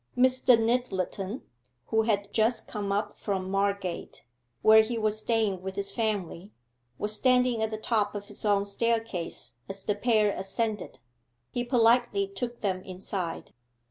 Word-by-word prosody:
Mr. 255 -1 +5
Nyttleton, 225 -2 -1 0.5
who 220 - +3
had 205 -2 -1
just 225 +2 +1
come 205 -2 -3
up 205 +1 -1
from 190 -2 -3
Margate, 195 - -2 0.4
where 220 0 +8
he 230 +2 -2
was 215 -1 0
staying 215 -4 0
with 190 0 -5
his 200 0 -3
family, 200 -3 -2 0.5
was 210 +1 -1
standing 250 -1 +3
at 220 - +1
the 215 - -4
top 215 -2 0
of 205 0 -5
his 205 - -7
own 200 -1 +2
staircase 225 -3 -1 0.2
as 195 0 -6
the 205 - +1
pair 215 -1 +2
ascended. 205 +2 -3 0.5
He 245 - -1
politely 240 -4 +3
took 235 +5 -5
them 185 -3 -1
inside. 185 -1 -4
210 Hz, 145 wpm, -28 LUFS, 195-230 Hz, 0.5 s, where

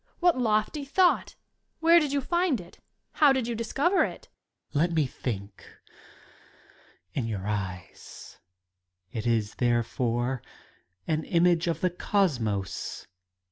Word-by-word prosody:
What 350 -1 +4
lofty 230 +4 0
thought! 350 +6 +2 0.4
Where 335 +1 +6
did 300 -4 -1
you 280 0 +1
find 345 - +1
it? 175 - -13 0.3
How 295 -3 +5
did 265 -3 +1
you 240 - -2
discover 270 - +1
it? - - -6 0.4
Student. 160 +5 +2
Let 170 - -4
me 155 -2 +3
think 100 -6 -6 1.5
In 120 -4 -2
yoiur 100 -4 -4
eyes! 95 -4 -6 0.4
— 90 0 -45
^It 110 0 -3
is, 110 -3 +1
there 120 -1 +3
fore, 120 +2 -1 0.6
an 155 0 0
image 175 0 +3
of 165 -1 -1
the 185 - +2
Cosmos. 125 - -1
165 Hz, 135 wpm, -27 LUFS, -, 1.5 s, Where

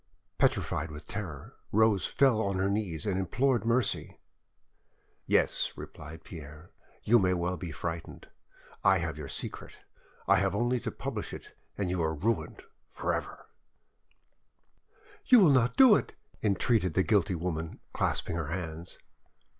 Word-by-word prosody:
Petrified 80 +2 +1
with 75 0 -9
terror, 90 -10 -7
Rose 110 -2 +3
fell 130 -6 +3
on 100 -3 -1
her 95 +1 +1
knees 100 -4 -2
and 95 -2 0
implored 120 +6 +1
mercy. 120 -1 0 1.1
"Yes," - - +2
replied 80 +2 -10
Pierre, 75 0 -11 0.3
"you 120 +2 +5
may 90 -2 +2
well 90 +1 -1
be 90 -2 -6
frightened: 80 +2 -6 0.6
I 95 -1 +5
have 80 -3 -3
your 70 - -6
secret. - - -6 0.4
I - - +5
have 95 0 +1
only 120 +3 +1
to - - -4
publish - - -5
it - - -10 0.2
and 95 -3 -1
you 90 -1 -1
are 80 0 0
ruined 110 +9 -2 0.3
for - - -2
ever:" - - -5 1.8
You 250 - +8
will 170 -6 +6
not 125 -2 +3
do 260 -6 +8
it! - - -2 0.3
"entreated 100 -3 +1
the 95 - +4
guilty 95 -4 +2
woman, 80 -1 -4
clasping 85 - -1
her 80 -4 -3
hands. 80 0 -5
95 Hz, 145 wpm, -30 LUFS, 80-110 Hz, 1.8 s, You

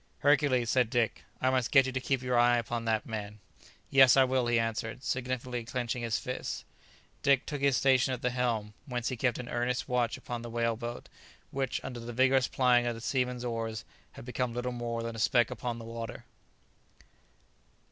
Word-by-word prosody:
"Hercules," 140 -5 +3
said 125 -3 +3
Dick, 120 -2 0
"I 130 - +2
must 130 -2 +1
get 135 -3 +6
you 130 - -2
to 130 - -2
keep 130 0 -1
your 125 -1 0
eye 120 0 +5
upon 120 0 -3
that 110 -1 0
man." 105 -2 -5 0.5
"Yes, 135 -1 +7
I 135 - +8
will," 130 -1 +1
he 120 0 +3
answered, 115 +1 -2
significantly 125 -1 -2
clenching 120 0 -3
his 115 -1 0
fists. 125 - -5 0.6
Dick 140 -2 +3
took 145 -3 -4
his 140 -2 +3
station 130 -1 +3
at 125 - -4
the 125 - +1
helm, 115 -4 -1
whence 120 -3 -2
he 130 - -3
kept 125 0 0
an 125 - -6
earnest 120 +1 -1
watch 120 -2 0
upon 120 -1 -6
the 120 - -7
whale 115 0 0
boat, 120 +1 -6 0.4
which 135 -2 -1
under 125 -2 -6
the 120 +1 -7
vigourous 130 +1 +3
plying 125 -2 +3
of 120 - -1
the - - -8
seamen's 125 0 -1
oars 115 -5 -3 0.3
had - - -11
become 125 -1 -2
little 125 +1 -2
more 120 -1 -3
than 115 0 -4
a - - -6
speck 120 +2 +3
upon 120 -2 -4
the 115 - -8
water. 115 -1 -7
120 Hz, 200 wpm, -30 LUFS, 115-130 Hz, 0.6 s, I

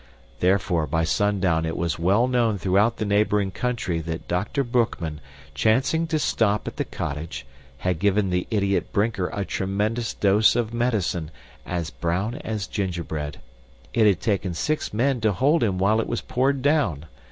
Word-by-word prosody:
Therefore, 90 -3 +2
by 80 +3 0
sundown 95 -2 +1
it 80 0 -2
was 85 -2 -1
well 100 +8 +3
known 120 -4 +1
throughout 100 +5 +2
the 110 - -2
neighboring 100 -1 +2
country 115 -8 -2
that 80 +1 -5
Dr. 100 +10 -1
Boekman, 115 - -1 0.3
chancing 130 - +2
to 160 -1 0
stop 105 -8 +1
at - - -6
the - - 0
cottage, 70 -2 -5 0.3
had 90 +4 -1
given 100 0 +2
the 90 0 0
idiot 100 -3 0
Brinker 100 -3 0
a 100 -1 -3
tremendous 105 +6 -1
dose 105 +3 +4
of 120 -2 -1
medicine, 105 -9 0 0.4
as 85 -3 -3
brown 95 +7 -1
as 110 -8 -4
gingerbread. 85 -7 -4 0.5
It 110 -2 +4
had 95 -5 +2
taken 95 -5 -1
six 155 - -1
men 125 +3 +1
to 110 -2 +2
hold 145 - +2
him 100 -5 +1
while 105 +4 +3
it - - -4
was 120 - -2
poured 135 +1 0
down. 125 - +1
100 Hz, 165 wpm, -24 LUFS, 90-115 Hz, 0.5 s, dose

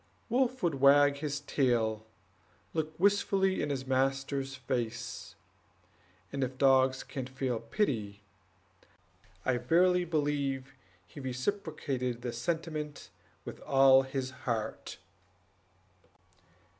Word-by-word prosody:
Wolf 255 +1 +1
would 150 -6 0
wag 140 0 +6
his 145 -1 -3
tail, 115 -6 0 0.7
look 155 0 -3
wistfully 195 -1 +2
in 145 - -1
his 135 -2 -3
master's 135 +1 0
face, 120 -2 -4 1.0
and 135 -1 -1
if 130 0 -4
dogs 130 -1 +4
can 130 -4 -6
feel 130 -2 -2
pity, 110 - -2 1.2
I 130 -1 +2
verily 180 +8 +3
believe 140 -4 -1 0.3
he 120 - -12
reciprocated 130 - -3
the 120 -2 -3
sentiment 150 +3 -4 0.3
with - - -8
all 135 -1 +6
his 130 -1 -4
heart. 115 -4 -4
135 Hz, 100 wpm, -31 LUFS, 125-150 Hz, 1.2 s, wag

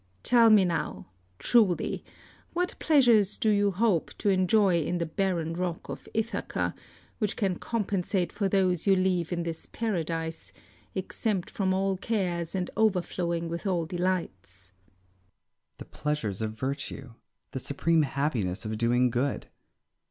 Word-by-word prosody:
Tell 235 -2 +6
me 210 -3 +6
now, 170 -2 -2 0.3
truly, 210 - +2 0.5
what 355 +1 0
pleasures 235 -10 +4
you 205 -1 +4
hope 195 -3 +1
to 205 - 0
enjoy 185 -1 +3
in 175 +4 -1
the 170 - -1
barren 165 -1 -1
rock 175 -1 -3
of - - -7
Ithaca, 225 +1 -2 0.5
which 210 -3 0
can 190 -4 -1
compensate 195 -5 -1
for 200 -2 0
those 185 -2 +1
you 195 - +6
leave 185 -2 +1
in 170 -1 -1
this 165 -1 -3
paradise, 165 -7 -3 0.4
exempt 190 0 -2
from 190 -2 0
all 190 0 +1
cares 180 -5 -2
and 180 -2 -2
overflowing 180 -5 0
with 170 +4 -4
all 175 -3 0
delights? 100 - -3
Ulysses. 90 0 -40
The - - -9
pleasures 115 -10 -3
of 110 -1 -2
virtue; 135 +1 -4 0.4
the 130 - -4
supreme 160 +5 +1
happiness 135 -10 -1
of 110 0 -3
doing 120 +1 +3
good. 130 +3 -1
175 Hz, 135 wpm, -28 LUFS, 145-195 Hz, 0.5 s, Tell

